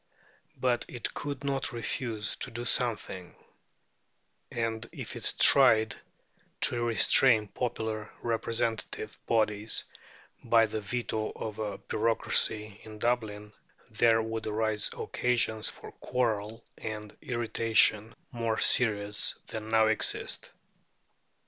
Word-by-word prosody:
But 125 -2 +1
it 120 -3 -5
could 145 -1 -5
not 140 -1 -1
refuse 115 -2 -3
to - - -3
do 120 +1 -6
something; 105 -8 -2 1.2
and 115 0 -3
if - - -7
it - - +1
tried 115 -5 +6 0.7
to 120 -1 +1
restrain 115 -1 +5
popular 110 -3 -4
representative 115 -1 -2
bodies 110 -1 +1 0.6
by 115 -1 +4
the 110 0 -4
veto 110 0 -3
of 110 -1 -6
a 105 -2 -3
bureaucracy 110 -1 +1
in 110 -1 -10
Dublin, 105 -3 -2 0.4
there 115 0 +3
would 110 0 -4
arise 110 0 0
occasions 120 -3 0
for - - -10
quarrel 115 -2 -2 0.2
and 105 -1 -6
irritation 115 -4 +2 0.2
more 115 -2 -2
serious 105 -4 +2
than 110 0 -6
now 110 0 +4
exist. 110 0 0
110 Hz, 105 wpm, -29 LUFS, 110-120 Hz, 1.2 s, tried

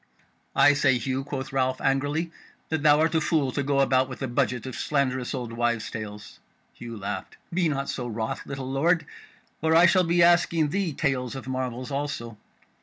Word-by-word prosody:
"I 145 - +6
say, 130 -3 +3
Hugh," 130 +3 -2
quoth 135 0 -5
Ralph 130 -1 +1
angrily, 145 +5 0 0.4
"that 160 -2 -1
thou 150 0 +5
art 160 +1 +2
a 160 - +2
fool 150 -4 +1
to 140 - -1
go 140 0 +1
about 130 -1 +3
with 130 +1 -7
a - - -1
budget 120 -1 -1
of 130 - -6
slanderous 130 -2 -1
old 120 -3 -5
wives' 120 -1 -1
tales." 105 -2 -8 0.3
Hugh 115 -1 -8
laughed. 100 -1 -5 0.2
"Be 175 -2 +2
not 140 -2 -2
so 125 -2 -3
wroth, 110 -1 -3
little 135 -1 -5
lord, 160 +4 +2 0.6
or 160 +1 +3
I 170 +1 +7
shall 185 +2 +5
be 170 0 +3
asking 170 -2 +4
thee 190 0 -1
tales 135 -3 -1
of 135 -1 -7
marvels 130 0 -3
also. 135 -6 -4
135 Hz, 185 wpm, -26 LUFS, 125-150 Hz, 0.6 s, I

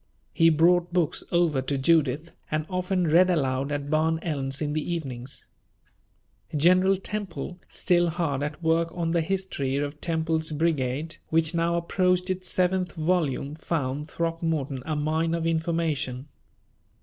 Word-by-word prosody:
He 165 0 +5
brought 170 +2 +3
books 175 -3 0
over 170 -6 +2
to 140 +1 -2
Judith, 155 +1 +1
and 155 0 -1
often 180 0 0
read 175 +4 +5
aloud 135 -4 0
at 145 0 -3
Barn 160 +1 +2
Elms 135 -4 -1
in 150 -1 -2
the 155 - 0
evenings. 130 -5 -6 1.1
General 185 +5 +4
Temple, 190 -3 -5
still 175 -1 +2
hard 160 -5 -1
at 150 +3 -4
work 165 +1 +2
on 165 -1 0
the 170 0 +2
History 160 -7 -2
of 145 +1 -3
Temple's 160 -1 0
Brigade, 150 0 -1
which 160 +1 +3
now 170 0 +1
approached 180 +2 +1
its 185 0 -3
seventh 185 0 +1
volume, 155 -5 0
found 150 -2 -3
Throckmorton 165 -5 -2
a 155 - -1
mine 160 +2 0
of 165 -1 -2
information. 160 -5 -1
160 Hz, 140 wpm, -26 LUFS, 145-175 Hz, 1.1 s, He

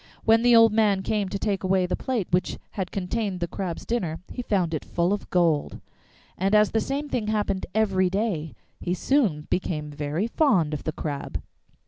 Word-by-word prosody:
When 225 0 +5
the 245 0 +5
old 225 -1 +7
man 205 -3 +3
came 205 -2 -1
to 200 - -2
take 195 -1 -1
away 185 -1 +2
the 180 - -1
plate 240 -8 -2
which 180 +1 +1
had 190 -3 -3
contained 195 0 -2
the 175 - -1
Crab's 175 -1 -5
dinner, 180 -9 -2
he 250 - -4
found 185 -8 0
it 155 - -2
full 175 +3 0
of 205 - -4
gold, 165 -5 +1 0.6
and 195 +3 +2
as 210 -1 +5
the 225 - +1
same 280 +4 -2
thing 235 -6 -2
happened 205 -3 -1
every 190 -4 +2
day 190 -6 -2 0.2
he 180 0 -1
soon 190 - +1
became 150 -5 -1
very 150 +6 -2
fond 225 - +2
of 150 - -5
the 155 - 0
Crab. 145 -3 -4
190 Hz, 190 wpm, -25 LUFS, 170-220 Hz, 0.6 s, old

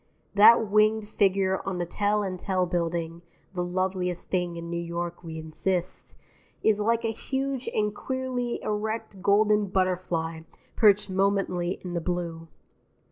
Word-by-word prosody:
That 220 +2 +7
winged 215 +1 +3
figure 195 -2 +1
on 190 -2 -3
the 175 - -1
Tel 205 +4 0
and 185 -2 -4
Tel 185 -1 0
Building 170 -1 -2 0.3
(the 180 -1 -1
loveliest 180 0 -2
thing 180 -2 0
in 170 0 -6
New 170 0 -3
York, 170 +1 -4
we 160 -1 -7
insist) 175 +3 -3 0.5
is 215 -1 +3
like 230 +2 +1
a 225 - +1
huge 265 +3 -3
and 210 -1 0
queerly 255 0 -3
erect 215 -1 -3
golden 210 +1 +3
butterfly 180 -3 -1 0.4
perched 205 -2 +4
momently 190 -2 0
in 180 -1 -5
the 170 - -1
blue. 170 -1 -3
190 Hz, 140 wpm, -27 LUFS, 175-210 Hz, 0.5 s, That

